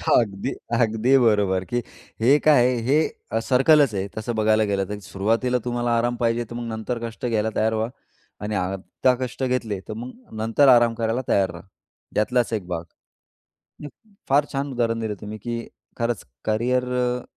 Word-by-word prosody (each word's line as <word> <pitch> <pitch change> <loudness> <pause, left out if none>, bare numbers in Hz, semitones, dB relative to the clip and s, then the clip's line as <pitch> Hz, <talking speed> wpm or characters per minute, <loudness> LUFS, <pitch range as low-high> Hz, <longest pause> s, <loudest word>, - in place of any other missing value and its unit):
अगदी, 105 +2 0 0.3
अगदी 115 +3 +3
बरोबर. 105 -6 +3
की, 120 +3 -1 0.4
हे 130 +6 +6
काय 145 -6 +5
आहे? 125 0 +2
हे 130 -4 0
सर्कलच 135 +1 +4
आहे, 95 0 -2
तसं 115 +2 -3
बघायला 110 0 +3
गेलं 100 -2 0
तर. 105 0 -4
सुरुवातीला 110 +6 0
तुम्हाला 120 -1 0
आराम 120 +1 +1
पाहिजे 115 0 +1
तर 120 - -7
मग 120 0 -4
नंतर 110 +2 -3
कष्ट 115 +2 -8
घ्यायला 110 -2 +1
तयार 110 +1 +2
व्हा 110 +1 -1 0.5
आणि 105 0 -2
आता 95 +7 0
कष्ट 125 +1 -4
घेतले 125 -6 -1
तर - - -4
मग 125 +3 -7 0.3
नंतर 115 +6 +3
आराम 120 -2 +6
करायला 115 +2 -1
तयार 95 -1 +2
राहा, - - -11 0.5
त्यातलाच 120 +3 +1
एक 105 -5 -2
भाग. 85 -2 -3 1.0
उम्म, 150 - -13 0.2
फार 140 +2 +4
छान 140 +1 -2
उदाहरण 115 -2 0
दिलं 110 -2 -2
तुम्ही, 105 0 -6
की 115 +2 -5 0.3
खरंच 115 -3 -2 0.2
करिअर 125 +4 +1
अ, 125 0 0
115 Hz, 170 wpm, -23 LUFS, 110-125 Hz, 1.0 s, हे